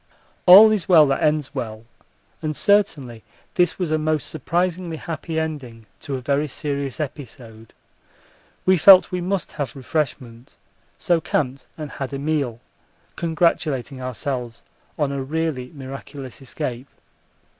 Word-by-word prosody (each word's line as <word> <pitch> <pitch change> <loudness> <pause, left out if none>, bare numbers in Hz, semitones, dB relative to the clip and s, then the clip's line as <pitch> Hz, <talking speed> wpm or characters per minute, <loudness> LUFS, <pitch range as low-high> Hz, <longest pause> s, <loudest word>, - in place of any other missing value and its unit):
All 205 +5 +10
is 210 -4 -1
well 160 -4 +8
that 135 - 0
ends 150 -2 +1
well, 115 -4 -5 0.6
and 155 -1 -3
certainly 145 - +1 0.3
this 180 0 +2
was 180 -4 -2
a 155 - +2
most 155 -2 -1
surprisingly 175 +2 -2
happy 160 0 -4
ending 135 -8 -5
to 140 - -4
a 130 - -5
very 140 +3 0
serious 140 0 -3
episode. 120 -6 -8 0.9
We 185 0 +5
felt 185 +2 +8
we 180 -1 -2
must 185 -2 -2
have 145 -4 -5
refreshment, 130 -3 -4 0.4
so 170 -2 +1
camped 135 -3 -2
and 150 -2 -6
had 135 0 -6
a - - -2
meal, 140 -5 -2 0.5
congratulating 155 -6 0
ourselves 125 -1 -4 0.3
on 145 -3 0
a 140 -1 -3
really 145 -3 -3
miraculous 135 -1 -9
escape. 130 -2 -5
145 Hz, 135 wpm, -22 LUFS, 130-160 Hz, 0.9 s, All